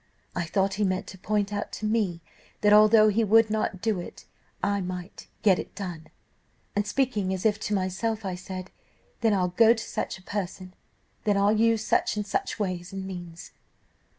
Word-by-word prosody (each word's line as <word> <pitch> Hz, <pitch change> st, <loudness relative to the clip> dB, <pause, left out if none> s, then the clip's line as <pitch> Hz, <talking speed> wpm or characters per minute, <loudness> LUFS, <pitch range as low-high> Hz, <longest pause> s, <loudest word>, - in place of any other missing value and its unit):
I 175 Hz, -, -1 dB
thought 195 Hz, +3 st, +1 dB
he 210 Hz, -, -1 dB
meant 185 Hz, -1 st, 0 dB
to 190 Hz, -, -10 dB
point 205 Hz, +1 st, -1 dB
out 205 Hz, -, -3 dB
to 215 Hz, -, -4 dB
me 210 Hz, -6 st, 0 dB, 0.4 s
that, 210 Hz, 0 st, +5 dB
although 215 Hz, +1 st, +7 dB
he 220 Hz, +2 st, +2 dB
would 220 Hz, +1 st, +5 dB
not 215 Hz, -4 st, -1 dB
do 220 Hz, -5 st, +1 dB
it, 175 Hz, -, -9 dB, 0.4 s
I 200 Hz, 0 st, +1 dB
might 180 Hz, 0 st, -6 dB, 0.2 s
get 195 Hz, -5 st, +5 dB
it -, -, -7 dB
done. 175 Hz, -6 st, -6 dB, 0.7 s
And, 205 Hz, 0 st, 0 dB
speaking 215 Hz, -5 st, 0 dB
as 185 Hz, -, -6 dB
if 215 Hz, -1 st, +3 dB
to 210 Hz, -, -1 dB
myself, 200 Hz, +4 st, -2 dB
I 190 Hz, -, -2 dB
said, 185 Hz, +1 st, -7 dB, 0.5 s
'Then 225 Hz, -3 st, +3 dB
I'll 180 Hz, -2 st, +1 dB
go 225 Hz, +6 st, +5 dB
to 220 Hz, -, -5 dB
such -, -, -4 dB
a 190 Hz, -, -18 dB
person; 185 Hz, -2 st, -5 dB, 0.5 s
then 205 Hz, -2 st, +3 dB
I'll 200 Hz, +2 st, +4 dB
use 225 Hz, 0 st, +2 dB
such -, -, +1 dB
and 210 Hz, -, -1 dB
such 205 Hz, -, -2 dB
ways 185 Hz, -3 st, -3 dB
and 195 Hz, -1 st, -5 dB
means. 175 Hz, -3 st, -8 dB
200 Hz, 190 wpm, -27 LUFS, 185-215 Hz, 0.7 s, although